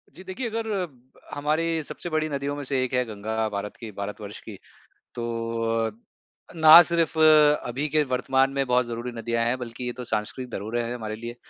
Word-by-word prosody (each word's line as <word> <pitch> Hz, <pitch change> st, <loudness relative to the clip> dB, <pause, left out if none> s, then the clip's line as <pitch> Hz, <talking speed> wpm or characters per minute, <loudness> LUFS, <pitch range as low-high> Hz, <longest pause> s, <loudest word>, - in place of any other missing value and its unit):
जी, 185 Hz, -, -11 dB
देखिए 195 Hz, +6 st, -4 dB
अगर 225 Hz, 0 st, -3 dB
अ, 185 Hz, -3 st, -1 dB, 0.5 s
हमारी 160 Hz, +2 st, 0 dB
सबसे 175 Hz, -, -7 dB
बड़ी 155 Hz, -1 st, 0 dB
नदियों 140 Hz, 0 st, -3 dB
में 145 Hz, -, -5 dB
से 130 Hz, -1 st, 0 dB
एक 130 Hz, -, -4 dB
है 125 Hz, 0 st, +2 dB
गंगा, 110 Hz, +1 st, -3 dB
भारत 100 Hz, 0 st, -5 dB
की 115 Hz, -2 st, -8 dB
भारत 105 Hz, +2 st, -6 dB
वर्ष 105 Hz, 0 st, -8 dB
की। -, -, -10 dB, 0.6 s
तो 115 Hz, -1 st, -1 dB
अ, -, -, -5 dB, 0.6 s
ना 160 Hz, +1 st, +10 dB
सिर्फ 165 Hz, -2 st, 0 dB
अभी 150 Hz, -3 st, +4 dB
के 155 Hz, +1 st, +2 dB
वर्तमान 130 Hz, +1 st, +2 dB
में 135 Hz, 0 st, 0 dB
बहुत 125 Hz, 0 st, +2 dB
ज़रूरी 120 Hz, +1 st, -5 dB
नदियाँ 115 Hz, 0 st, -1 dB
हैं, 125 Hz, +2 st, 0 dB
बल्कि 120 Hz, 0 st, -7 dB
ये 125 Hz, -, -2 dB
तो 125 Hz, -, -8 dB
सांस्कृत 110 Hz, +3 st, -3 dB
धरोहर 110 Hz, +3 st, -4 dB
है 120 Hz, +1 st, -2 dB
हमारे 110 Hz, -2 st, -5 dB
लिए। 120 Hz, +2 st, -7 dB
125 Hz, 200 wpm, -25 LUFS, 115-150 Hz, 0.6 s, ना